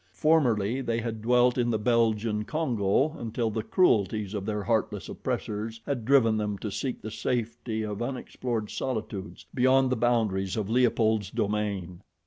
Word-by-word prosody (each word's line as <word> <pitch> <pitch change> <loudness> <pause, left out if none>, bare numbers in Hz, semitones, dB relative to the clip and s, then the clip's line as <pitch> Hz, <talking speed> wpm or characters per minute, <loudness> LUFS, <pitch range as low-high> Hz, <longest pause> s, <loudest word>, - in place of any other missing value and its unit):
Formerly 130 -7 +2
they 115 -2 -1
had 115 -1 -4
dwelt 125 +2 +3
in 120 -1 +2
the 115 - +1
Belgian 110 -1 +1
Congo 130 +1 0
until 115 0 -2
the 110 +1 -2
cruelties 105 - +2
of 100 -1 -4
their 105 -1 -2
heartless 115 -1 -1
oppressors 110 +2 -4
had 125 -6 -2
driven 115 -4 +4
them 105 -1 -2
to 105 +1 -5
seek 130 +4 -4
the 110 - -5
safety 110 0 -2
of 105 0 -4
unexplored 120 -3 -3
solitudes 110 -6 -4
beyond 130 +1 +4
the - - +2
boundaries 110 -5 +1
of 110 -1 -2
Leopold's 110 -4 +2
domain. 100 -5 -2
110 Hz, 150 wpm, -27 LUFS, 105-125 Hz, -, driven